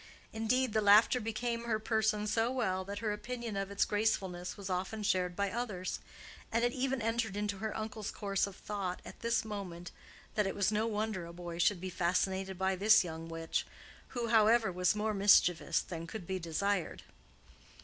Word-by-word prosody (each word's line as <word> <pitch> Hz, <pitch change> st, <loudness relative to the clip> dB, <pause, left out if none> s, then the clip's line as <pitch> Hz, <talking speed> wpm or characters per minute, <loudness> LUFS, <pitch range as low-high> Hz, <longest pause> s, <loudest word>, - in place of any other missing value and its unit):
Indeed, 225 Hz, +2 st, +1 dB
the 215 Hz, -, +3 dB
laughter 210 Hz, +4 st, +6 dB
became 230 Hz, +2 st, -2 dB
her 225 Hz, -2 st, +1 dB
person 215 Hz, -1 st, +1 dB
so 225 Hz, +3 st, +1 dB
well 190 Hz, -8 st, 0 dB
that 200 Hz, +1 st, -5 dB
her 210 Hz, -, +1 dB
opinion 235 Hz, +1 st, -5 dB
of 195 Hz, 0 st, -2 dB
its 200 Hz, 0 st, +1 dB
gracefulness 190 Hz, -4 st, -1 dB
was 200 Hz, -2 st, -7 dB
often 190 Hz, +4 st, -2 dB
shared 180 Hz, -3 st, +1 dB
by 200 Hz, 0 st, 0 dB
others; 210 Hz, -5 st, -3 dB, 0.5 s
and 230 Hz, +1 st, +2 dB
it 245 Hz, -, +2 dB
even 260 Hz, -2 st, -1 dB
entered 225 Hz, -3 st, -1 dB
into 205 Hz, -1 st, -2 dB
her 220 Hz, +1 st, -3 dB
uncle's 220 Hz, -1 st, -4 dB
course 200 Hz, -1 st, -1 dB
of 195 Hz, -, -9 dB
thought 195 Hz, -4 st, -4 dB
at -, -, -10 dB
this 235 Hz, -1 st, 0 dB
moment, 185 Hz, -5 st, -6 dB, 0.4 s
that 210 Hz, -2 st, +1 dB
it 195 Hz, -, -3 dB
was 200 Hz, +1 st, +2 dB
no 215 Hz, +1 st, +1 dB
wonder 210 Hz, -5 st, -2 dB
a 170 Hz, -, -10 dB
boy 170 Hz, -1 st, -7 dB
should 180 Hz, +2 st, +3 dB
be 185 Hz, +1 st, -5 dB
fascinated 190 Hz, +2 st, 0 dB
by 190 Hz, +1 st, +1 dB
this 210 Hz, +3 st, +6 dB
young 165 Hz, -1 st, -6 dB
witch—who, 165 Hz, +8 st, -5 dB
however, 225 Hz, -1 st, +5 dB
was 180 Hz, +2 st, +2 dB
more 215 Hz, +1 st, 0 dB
mischievous 180 Hz, -4 st, +4 dB
than 165 Hz, -2 st, -6 dB
could 215 Hz, -1 st, -7 dB
be 190 Hz, +1 st, -2 dB
desired. 180 Hz, +3 st, -1 dB
205 Hz, 180 wpm, -33 LUFS, 185-220 Hz, 0.5 s, laughter